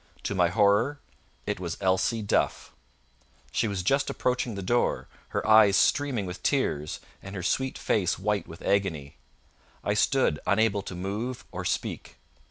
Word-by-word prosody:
To - - -2
my 90 -3 +3
horror 105 +9 +2 0.5
it - - -2
was 85 -2 -4
Elsie 100 +4 +1
Duff! 100 - 0 0.8
She 115 - +1
was 100 -3 -2
just 135 +9 +2
approaching 125 -3 -1
the 100 - -5
door, 120 +6 +1 0.2
her - - -3
eyes 110 -3 +7
streaming 135 -7 +2
with 90 0 -7
tears, 75 - -1 0.2
and 95 +1 -9
her 90 - -4
sweet 130 +8 0
face 95 -4 +1
white 105 +1 -1
with 85 +2 -11
agony. 80 -8 -1 0.7
I 105 - +1
stood 105 - +2
unable 100 +1 +2
to 95 - -7
move 105 +7 -4
or - - -5
speak. - - -3
100 Hz, 155 wpm, -27 LUFS, 95-115 Hz, 0.8 s, eyes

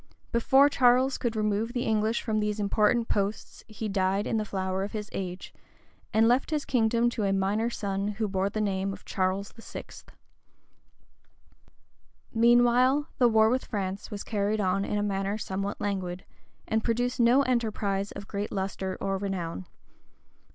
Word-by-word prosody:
Before 265 +4 +5
Charles 255 -1 +3
could 235 -2 -2
remove 215 +2 0
the 245 -1 -1
English 220 +1 0
from 220 -2 0
these 210 0 -1
important 210 +3 +2
posts, 200 +1 -2
he 215 0 -5
died 195 0 0
in 225 - 0
the 215 - -1
flower 190 -1 -2
of 200 - -5
his 210 -1 -5
age, 185 -1 -5 0.6
and 220 +1 +4
left 245 +3 +2
his 305 -2 -1
kingdom 235 -1 +2
to 220 - -3
a 195 - +1
minor 200 +4 +1
son 200 -3 -2
who 210 +1 -2
bore 195 0 0
the 215 - -4
name 195 -1 -1
of - - -12
Charles 190 +2 -1
VI. 225 - -9 2.5
{1378.} 225 - -1
Meanwhile 245 +4 +4
the 245 - +6
war 220 -1 +4
with 260 +1 0
France 195 -2 -4
was 205 -3 -6
carried 210 0 -1
on 195 0 +1
in 210 - -2
a 205 - 0
manner 195 0 -1
somewhat 195 -1 -4
languid, 185 -3 -3 0.4
and 220 0 0
produced 245 +2 0
no 245 +4 +5
enterprise 215 -6 -1
of 200 0 -8
great 205 0 -4
lustre 190 -1 -3
or 195 -1 -1
renown. 175 - -4
210 Hz, 165 wpm, -28 LUFS, 195-235 Hz, 2.5 s, the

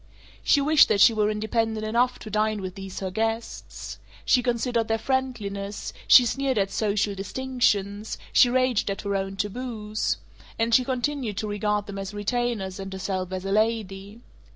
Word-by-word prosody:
She 285 - +4
wished 300 +1 +6
that 200 - +1
she 225 - +7
were 210 -1 +1
independent 220 +1 -1
enough 240 +3 +1
to 215 - -8
dine 215 0 +1
with 185 -2 -5
these 195 -1 -7
her 190 -1 -3
guests. 225 +3 -4 0.3
She 250 - +4
considered 240 -1 0
their 225 - +1
friendliness, 215 -6 -3
she 250 - +8
sneered 270 +1 0
at 195 -1 +1
"social 210 -1 0
distinctions," 205 -1 -1 0.2
she 245 - +6
raged 255 -4 +1
at 195 - -3
her 200 -1 -2
own 195 0 -2
taboos 215 +1 -2 0.4
and 230 0 0
she 255 - +6
continued 255 -4 -2
to 215 - -2
regard 210 0 -1
them 200 -1 -7
as 195 +1 -6
retainers 205 -3 -2
and 195 0 -6
herself 190 -1 -3
as 185 0 -4
a 195 - -2
lady. 210 -1 -1
215 Hz, 170 wpm, -25 LUFS, 200-240 Hz, 0.4 s, she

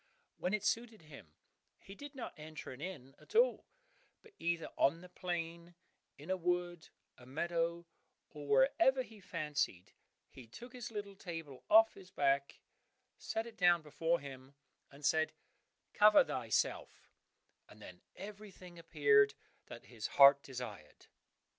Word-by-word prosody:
When 185 +4 0
it 210 - -4
suited 225 -5 -1
him 140 - -14 0.4
he 195 - -13
did 285 +6 -10
not 255 - -6
enter 155 -2 -9
an 130 +2 -10
inn 150 -7 -7
at - - -16
all, - - +3 0.6
but 450 - -18
either 170 -1 -1
on 165 +5 +2
the 180 - -12
plain, 170 -1 -5 0.4
in 150 +6 -7
a 190 - +1
wood, 175 -1 -2 0.3
a 125 - -15
meadow, 170 +4 -2 0.5
or 145 -2 -9
wherever 260 - +4
he 220 -2 -15
fancied, 150 - -3 0.4
he 125 -3 -13
took 240 - -11
his 245 -3 -6
little 205 -3 -6
table 165 -8 -8
off 220 +1 +7
his 190 -2 -14
back, 140 -5 0 0.6
set 225 0 -3
it 230 -2 -11
down 175 -4 +4
before 165 +3 0
him, 135 0 -11 0.3
and 140 +1 -10
said, 160 +1 +2 0.6
"Cover 210 - +7
thyself," - - -2 0.6
and - - -16
then - - -12
everything 195 -4 -11
appeared 145 -4 +4 0.3
that - - -10
his 110 0 -6
heart 140 0 +9
desired. 120 - -9
170 Hz, 140 wpm, -35 LUFS, 140-195 Hz, 0.6 s, heart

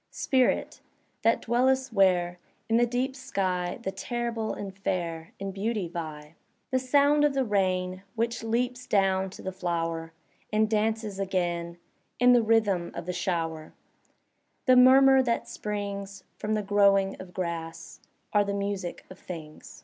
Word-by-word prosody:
Spirit! 260 -2 0 0.4
that 230 +1 +2
dwellest 260 +2 +1
where* 180 -3 +3 0.3
In 225 - +3
the 240 0 +4
deep 255 +3 -1
sky. 190 -9 -2
The 190 - -2
terrible 235 -1 -3
and 195 -2 -6
fair 170 -4 -3
In 195 0 -4
beauty 205 0 -2
vie! 155 -3 -7 0.4
The 260 - +2
sound 285 +3 +3
of 295 -2 +2
the 270 - +2
rain 185 -3 0
Which 230 +1 -1
leaps 245 +2 -1
down 190 -1 +2
to - - -12
the 190 - -3
flower. 165 -3 -3 0.4
And 215 0 +3
dances 215 -1 -1
again 175 -3 -2 0.4
In 245 0 +6
the 240 - +5
rhythm 215 -6 +2
of 170 - -5
the 180 - -3
shower; 165 -3 -3 0.9
The 255 - +6
murmur 265 +1 +7
that 235 -2 -1
springs 200 -1 -5
From 215 +1 -2
the 210 - -1
growing 200 -1 +3
of 185 -1 -11
grass 165 -2 -5 0.3
Are 205 -1 +5
the 200 0 -2
music 200 -3 -4
of 185 - -12
things. 160 -4 -10
200 Hz, 150 wpm, -27 LUFS, 180-235 Hz, 0.9 s, murmur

